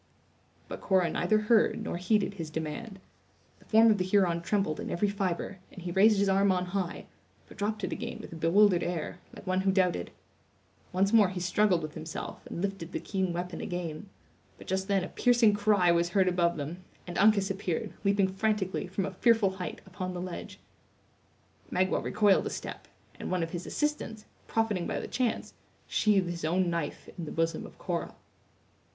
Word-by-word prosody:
But - - -7
Cora 185 -4 +2
neither 215 +4 +2
heard 220 0 +3
nor 215 - -3
heeded 200 +2 +1
his 165 -5 -6
demand. 160 +7 -5 0.6
The - - -21
form 225 +1 +6
of 210 - +2
the - - +2
Huron 185 -3 +2
trembled 175 -4 0
in - - -4
every 205 +4 +1
fibre, 195 -1 -2
and 185 - -10
he 175 - -3
raised 205 +4 +5
his 200 0 +2
arm 195 0 +4
on 180 -1 0
high, 190 -3 -2 0.4
but - - -14
dropped 210 +1 -2
it - - -2
again - - -4
with - - -9
a - - -7
bewildered 175 +3 +4
air, 175 0 -3 0.2
like - - -11
one 185 0 +1
who 190 0 +2
doubted. 180 - +1 0.8
Once 195 +3 +1
more 210 -4 +6
he 185 -1 -4
struggled 180 -1 +2
with 155 - -5
himself 160 +1 -6
and 170 - -5
lifted 195 -3 -4
the - - -1
keen 190 -3 -1
weapon 175 +1 -4
again; 175 +1 -5 0.5
but - - -12
just 190 +1 -1
then 195 -2 +2
a - - -3
piercing 235 -2 +4
cry 205 -4 +3
was 170 0 +2
heard 190 -1 +3
above 175 -2 +2
them, 160 +5 -5 0.2
and 175 - -4
Uncas 200 -1 +4
appeared, 190 -4 -3
leaping 200 -1 +3
frantically, 195 0 -1
from 190 +1 -2
a 195 - -4
fearful 225 -1 +3
height, 190 -1 -6
upon 185 -1 -5
the - - -4
ledge. 180 -1 -6 1.1
Magua 185 +1 +1
recoiled 205 -1 +3
a - - -2
step; - - -7 0.3
and - - -5
one 185 -2 0
of 165 - -4
his 175 -1 -5
assistants, 295 -8 -2 0.2
profiting 215 -6 0
by - - -2
the - - -5
chance, 250 -3 -1 0.3
sheathed 200 -4 +2
his 170 -2 -6
own 175 +2 +1
knife 170 -3 -3
in 170 - -3
the - - -6
bosom 165 0 -1
of - - -17
Cora. - - -3
190 Hz, 190 wpm, -29 LUFS, 175-205 Hz, 1.1 s, form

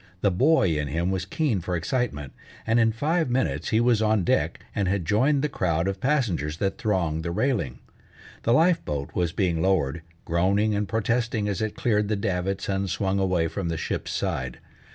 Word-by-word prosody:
The 100 - +3
boy 95 - +3
in 75 - -2
him 85 +6 -1
was 95 -1 -2
keen 115 - 0
for 90 +1 -2
excitement, 85 - -2 0.3
and 115 +1 +3
in 115 -1 +4
five 155 +6 0
minutes 130 +1 0
he 110 - +3
was 120 -2 +3
on 110 -3 +2
deck, - - +1
and 100 -2 0
had 95 -2 0
joined 135 - +2
the - - +2
crowd 85 - 0
of 95 0 -3
passengers 100 - 0
that 95 +4 -2
thronged 90 -9 0
the 85 - -3
railing. 90 - -1 0.6
The 115 - +1
life 165 +7 +4
boat 70 -1 -4
was 85 -2 0
being 85 -4 0
lowered, 80 -5 +1 0.2
groaning 100 +6 +2
and 105 -1 -1
protesting 115 0 0
as 100 -2 -2
it 110 -1 -2
cleared 105 -3 +1
the 105 - 0
davits 95 -1 -2
and 95 -1 -1
swung 95 +2 0
away 90 -4 +1
from 85 +1 -3
the 80 - -2
ship's - - -3
side. 65 -1 -2
100 Hz, 195 wpm, -25 LUFS, 85-115 Hz, 0.6 s, in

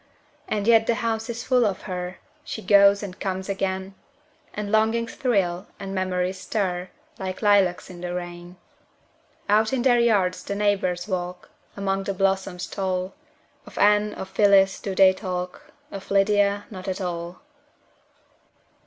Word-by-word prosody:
And 205 -1 -1
yet 225 -1 +5
the 235 - +2
house 225 0 -2
is 235 0 -4
full 255 -2 +3
of 200 -4 -1
her; 180 -1 -5 0.3
She 220 - -6
goes 200 0 +5
and 185 -2 -7
comes 190 -1 -3
again; 190 -1 -2 0.6
And 205 -1 -5
longings 225 +2 +1
thrill, 195 -7 0
and 195 -1 -6
memories 185 0 -1
stir, 185 -3 -2 0.3
Like 190 +1 -5
lilacs 200 -4 +3
in 175 -1 -11
the 180 0 -4
rain. 175 0 -7 0.9
Out 215 +2 +3
in 250 -2 0
their 245 -2 +4
yards 200 -6 +2
the 200 - -4
neighbors 195 -3 0
walk, 180 -2 -4 0.3
Among 195 -1 -1
the 195 - -2
blossoms 190 -1 0
tall; 185 -1 -3 0.5
Of - - -13
Anne, 210 0 +3
of 190 - -6
Phyllis, 195 -1 +4
do 195 -2 -4
they 190 0 +6
talk, 180 -2 -5 0.2
Of 195 -1 -8
Lydia 200 0 +2
not 185 -1 -8
at 190 +1 -2
all. 175 -1 -5
195 Hz, 150 wpm, -24 LUFS, 185-210 Hz, 0.9 s, they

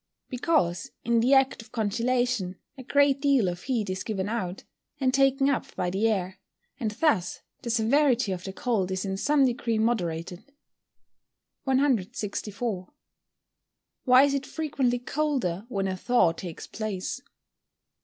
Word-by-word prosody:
_ - - -49
Because, 245 - 0
in 235 0 +2
the 255 +4 +4
act 270 -2 +3
of 225 - -17
congealation 235 -2 0 0.2
a 265 - -9
great 280 +1 +3
deal 275 -8 +3
of 175 0 -3
heat 235 -6 -1
is 185 0 -3
given 200 -3 -2
out, 200 -5 -3 0.4
and 260 -2 +1
taken 270 0 +3
up 280 -3 -1
by 180 -1 -1
the 200 +4 +1
air, 190 -3 -1 0.4
and 225 -5 -1
thus 210 - 0 0.2
the 235 - -5
severity 235 0 +2
of 180 -1 -4
the 190 - -5
cold 195 -2 -1
is 190 +1 -2
in 190 -1 -2
some 280 +7 +3
degree 235 -2 0
moderated. 180 -6 -1 1.2
164. 215 -5 -1 1.2
_Why 255 +2 +8
is 280 - 0
it 275 -1 -2
frequently 275 -6 0
colder 245 - -2
when 195 -5 -1
a 190 - -2
thaw 235 -3 +3
takes 165 0 -8
place? 215 +2 -4
230 Hz, 145 wpm, -27 LUFS, 190-265 Hz, 1.2 s, Why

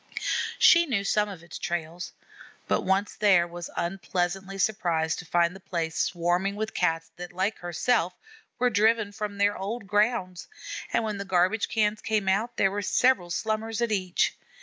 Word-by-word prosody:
She 340 0 +6
knew 220 -8 0
some 210 +1 +1
of 185 -4 -9
its 170 - -9
trails; 170 +1 -4 0.6
but - - +1
once 190 +2 0
there, 190 -5 +4
was 175 0 -7
unpleasantly 190 +1 -2
surprised 170 -6 0
to 180 - -8
find 170 +1 +2
the - - -10
place 165 -4 -3
swarming 180 +3 0
with 220 +1 -3
Cats 165 -2 0
that, 175 0 -7
like 190 +4 -1
herself, 180 +2 0 0.4
were 250 0 +2
driven 220 0 +3
from 205 0 -5
their 205 +1 +2
old 205 +3 -4
grounds, 205 -3 0 0.4
and - - +1
when 215 -2 -2
the - - -2
garbage 190 +3 +1
cans 215 -1 +1
came 215 -3 -1
out 215 +6 0
there 195 - +3
were 205 +1 -2
several 210 -3 +2
Slummers 220 +4 -2
at 235 -2 0
each. 185 -4 +1
195 Hz, 170 wpm, -27 LUFS, 175-215 Hz, 0.6 s, She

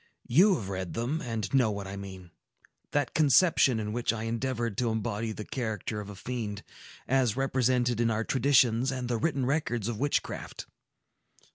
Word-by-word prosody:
You 185 - +5
have 100 - -5
read 95 -2 -4
them, 125 +8 -1
and 115 -2 -4
know 130 -5 +4
what 100 -1 -4
I 95 +1 -6
mean,—that 100 - -7
conception 150 -4 +4
in 105 -1 -3
which 120 -1 0
I 115 -1 -4
endeavored 115 -1 -2
to 120 -2 +1
embody 110 0 -2
the 105 -1 -6
character 110 -3 -3
of 105 - -9
a 105 - -8
fiend, 105 -1 -5 0.4
as 130 -3 +2
represented 125 -3 +1
in 115 - +2
our 110 0 0
traditions 130 -1 +3
and 130 -2 -3
the 120 -1 0
written 140 -1 0
records 120 -6 -1
of 115 -3 -3
witchcraft. 145 +1 -2
120 Hz, 165 wpm, -29 LUFS, 110-130 Hz, 0.4 s, You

